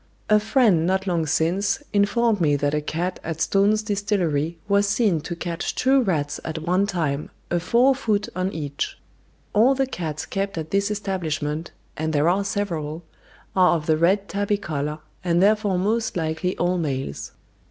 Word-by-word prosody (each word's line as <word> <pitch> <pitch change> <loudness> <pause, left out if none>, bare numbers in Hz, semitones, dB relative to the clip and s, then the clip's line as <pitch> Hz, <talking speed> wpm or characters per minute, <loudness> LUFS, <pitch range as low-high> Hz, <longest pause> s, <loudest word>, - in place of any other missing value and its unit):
A 210 - +7
friend 210 -7 +3
not 190 +1 +1
long 170 -4 0
since 165 +6 +1 0.2
informed 210 +1 +2
me 145 -3 +3
that 145 +1 0
a 150 - +1
cat 175 +4 -3
at 165 -1 -4
Stone's 205 +4 +2
Distillery 180 -7 -1
was 200 0 +3
seen 200 -7 +2
to 170 - -5
catch 170 0 -4
two 265 +1 +3
rats 155 - -1
at 160 0 -4
one 180 +4 +2
time, 155 -7 -2 0.2
a 175 - +2
fore 240 +9 +4
foot 215 -6 0
on 185 +1 -1
each. 145 -4 -4 0.6
All 240 +6 +5
the 270 0 +1
cats 160 - -4
kept 195 -1 -3
at 160 -1 -5
this 200 +1 +1
establishment, 165 -6 -2 0.3
and 160 +1 -2
there 150 +1 +2
are 195 +3 +2
several, 170 -6 -3 0.5
are 180 -2 +5
of 155 -2 -3
the 155 - +3
red 190 +5 +2
tabby 205 +1 0
colour, 150 -5 -3 0.3
and 170 -1 +2
therefore 205 -1 +3
most 220 +3 0
likely 160 +3 -1
all 180 +1 +1
males. 135 - -3
180 Hz, 170 wpm, -23 LUFS, 160-205 Hz, 0.6 s, A